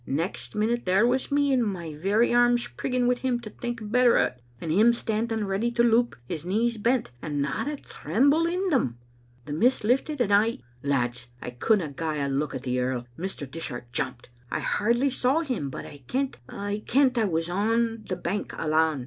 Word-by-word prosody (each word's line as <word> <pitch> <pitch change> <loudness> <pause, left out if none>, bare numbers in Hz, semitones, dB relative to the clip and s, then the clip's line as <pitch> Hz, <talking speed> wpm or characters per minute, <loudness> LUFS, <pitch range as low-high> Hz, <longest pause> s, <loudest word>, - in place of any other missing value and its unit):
Next 160 +8 -3
minute 230 +3 0
there 190 +5 +4
was 255 +3 0
me, 285 -1 +3
my 190 -10 -1
very 200 +10 +2
arms 240 0 +4
prigging 250 -1 -1
wi' 250 - +4
him 250 -1 0
to 215 - -8
think 240 -1 -5
better 250 0 +5
o't, - - +2 0.3
and 160 - -3
him 220 +8 +5
standing 225 -1 -1
ready 200 +4 0
to 235 0 +3
loup, 235 +1 +3
his 160 -1 -4
knees 220 +5 0
bent, 235 - +1
and 150 -2 -3
not 140 - -1
a 300 - -1
tremble 280 - +1
in 365 +3 0
them. 130 - +1 0.5
The 145 - -5
mist 240 - +2
lifted, 265 +6 +1
and 210 -5 +2
I 220 +3 +4 0.2
Lads, 125 -3 -1
I 125 - -6
couldna 170 - +1
gie 155 +2 -3
a 140 - 0
look 140 +1 -1
to - - -2
the 125 -1 -2
earl. 125 -1 -1
Mr. 180 -4 -5
Dishart 120 -5 -6
jumped; 120 0 -3 0.2
I - - -2
hardly 240 +6 +1
saw 260 +5 +2
him, 250 - -2
but - - -7
I 145 - -11
kent, 270 +1 -1
I 205 +1 -4
kent, 265 0 +4
for 240 - +1
I - - +3
was 165 -3 0
on 225 +4 0
the 185 - 0
bank 180 +3 -3
alane. 155 -2 +2
210 Hz, 200 wpm, -26 LUFS, 155-240 Hz, 0.5 s, better